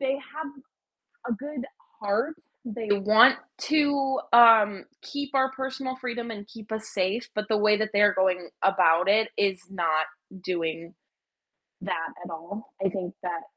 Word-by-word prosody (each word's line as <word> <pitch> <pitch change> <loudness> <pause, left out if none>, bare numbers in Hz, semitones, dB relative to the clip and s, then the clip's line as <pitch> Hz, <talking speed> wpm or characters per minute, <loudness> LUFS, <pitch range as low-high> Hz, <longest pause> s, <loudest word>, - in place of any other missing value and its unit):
they 270 0 0
have 300 +3 -7 0.8
a 235 - 0
good 275 +2 -7 0.4
heart. 215 +9 -1 0.3
They 225 -1 -6
want 210 +2 +6 0.3
to, 285 -3 +1
um, 225 -4 +7 0.2
keep 285 0 -6
our 265 0 +3
personal 265 0 -5
freedom 240 -2 -5
and 205 -2 -8
keep 220 -1 -13
us 220 0 -4
safe, 200 +5 -1
but 210 0 -2
the 220 - +2
way 210 0 +4
that 215 0 -2
they're 205 0 +4
going 180 -2 0
about 185 -2 +3
it 220 +2 +4
is 190 -2 +1
not 165 -5 0 0.4
doing 170 0 -3 0.9
that 165 0 -3 0.2
at 175 - -9
all. 170 +6 -9
I - - +3
think 185 -1 -5
that, 175 -2 -4
210 Hz, 150 wpm, -26 LUFS, 190-260 Hz, 0.9 s, um